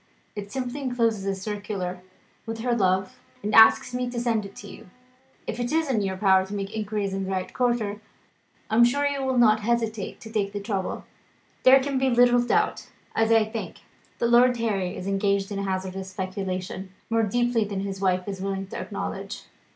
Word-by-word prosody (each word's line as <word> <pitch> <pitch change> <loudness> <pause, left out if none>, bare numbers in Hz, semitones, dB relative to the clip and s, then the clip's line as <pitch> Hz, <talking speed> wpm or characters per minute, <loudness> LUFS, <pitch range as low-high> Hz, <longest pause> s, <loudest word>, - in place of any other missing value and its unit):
It 205 -1 -6
simply 260 +1 -4
encloses 230 -6 0
a 195 - 0
circular, 195 -2 -4 0.5
with 225 0 -4
her 245 0 +1
love, 190 -2 +1 0.2
and 210 +1 -2
asks 225 +2 +7
me 250 0 -1
to 245 -1 -3
send 230 -3 0
it - - -13
on - - -20
to 205 - -10
you. 185 - -12 0.6
If - - -4
it 240 0 -2
is 320 -3 +1
in 220 -5 +1
your 190 -1 -2
power 190 -1 +4
to 195 +2 -6
make 200 +2 -4
inquiries 210 -2 -2
in 195 0 -2
the - - -5
right 185 -1 -3
quarter, 230 -4 0 0.7
I 220 - +2
am 235 - +8
sure 280 +4 +3
you 285 -1 0
will 260 -1 0
not 220 -3 +5
hesitate 225 -2 -1
to 220 - -10
take 205 -2 -1
the 205 - -3
trouble. 200 -2 -3 0.6
There 265 +1 +8
can 270 0 -1
be 265 0 +2
little 245 0 +5
doubt, 240 - 0 0.3
as 225 0 +2
I 225 -1 +5
think, 220 +1 -6 0.4
that 235 0 +1
Lord 245 +1 +5
Harry 195 -6 -1
is 180 - -6
engaged 195 0 0
in 200 - -3
a - - -2
hazardous 190 0 -3
speculation, 190 -1 -4 0.2
more 230 0 +3
deeply 240 +2 +1
than 200 -2 -4
his 195 -1 -5
wife 185 -1 +1
is 195 -2 -5
willing 195 0 -2
to - - -5
acknowledge." - - -5
210 Hz, 205 wpm, -25 LUFS, 195-240 Hz, 0.7 s, am